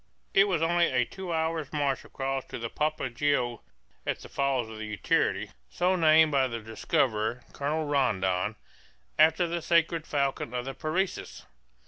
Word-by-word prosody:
It 195 - +6
was 175 -5 0
only 170 +1 +3
a 125 -1 +1
two 190 +3 -7
hours' 160 -2 -1
march 145 -3 0
across 135 0 -3
to - - -7
the 115 -1 -5
Papagaio 135 -5 0 0.4
at - - -1
the - - -11
Falls 135 -4 0
of 110 -1 -8
Utiarity, 105 -1 0 0.2
so 180 - +1
named 160 -2 +5
by 135 -2 +3
their 115 -2 -5
discoverer, 110 +1 0
Colonel 155 +3 -1
Rondon, 105 -8 +1 0.6
after 160 +3 +5
the 170 0 -2
sacred 165 -1 +2
falcon 140 -4 -1
of 125 0 -2
the 135 - -4
Parecis. 175 +7 -3
140 Hz, 150 wpm, -28 LUFS, 120-160 Hz, 0.6 s, It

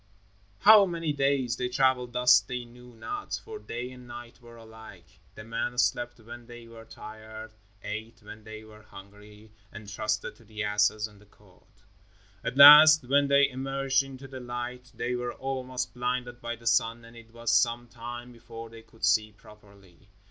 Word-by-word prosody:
How 210 -2 +8
many 165 -3 -3
days 135 -3 0
they 125 - -2
traveled 125 -1 +1
thus 125 -1 +6
they 125 0 -6
knew 120 0 -16
not, 410 - -5
for 440 -1 -8
day 125 - -6
and 125 -1 -13
night 120 0 -11
were 120 -1 -15
alike. 110 -6 -15 0.2
The 105 - -10
men 115 +2 -4
slept 120 -1 0
when 120 +1 -12
they 120 -1 -12
were 115 -1 -13
tired, 110 0 -11 0.3
ate 110 +2 -6
when 105 +1 -12
they 110 0 -10
were 110 0 -15
hungry 105 +1 -15 0.2
and 105 0 -11
trusted 105 +1 -3
to - - -20
the 110 -1 -6
asses 105 +1 +1
and 105 -1 -20
the 105 - -21
cord. 100 -2 -25 0.8
At 125 - -4
last 150 0 +10
when 140 +2 +3
they 140 0 +5
emerged 135 +1 -1
into 135 0 -10
the 130 0 -9
light 125 0 -7
they 125 - -3
were 125 0 -3
almost 130 -2 -4
blinded 125 0 -3
by 120 0 -4
the 115 0 -19
sun, 115 0 +1
and 115 0 -15
it 115 -1 -15
was 115 0 -2
some 120 0 +2
time 120 +1 -9
before 115 -1 -11
they 115 0 -12
could 115 0 -6
see 110 0 +2
properly. 100 -3 -20
120 Hz, 175 wpm, -27 LUFS, 110-125 Hz, 0.8 s, last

